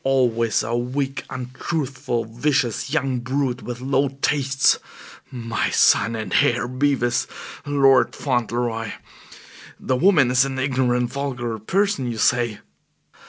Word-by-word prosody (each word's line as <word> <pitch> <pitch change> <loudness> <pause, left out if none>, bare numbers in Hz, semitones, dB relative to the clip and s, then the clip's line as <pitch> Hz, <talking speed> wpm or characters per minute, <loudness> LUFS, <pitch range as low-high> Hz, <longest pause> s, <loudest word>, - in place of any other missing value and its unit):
Always 120 -5 +1
a 115 +2 -2
weak, 135 +3 -2
untruthful, 130 -1 -3
vicious 120 +1 -1
young 135 -5 0
brute 130 0 -2
with 120 0 -7
low 135 +1 +1
tastes 135 0 +1 0.5
my 115 -2 -2
son 115 - +3
and 110 -5 -5
heir, 120 0 +1
Bevis, 125 -2 0 0.4
Lord 135 -2 +4
Fauntleroy. 120 -3 -2 0.9
The 130 - -1
woman 140 -3 +4
is 125 0 +4
an 135 -1 -3
ignorant, 125 -2 0
vulgar 125 -5 -3
person, 160 - 0
you 115 - -5
say?" 120 -1 +1
125 Hz, 115 wpm, -22 LUFS, 120-135 Hz, 0.9 s, Lord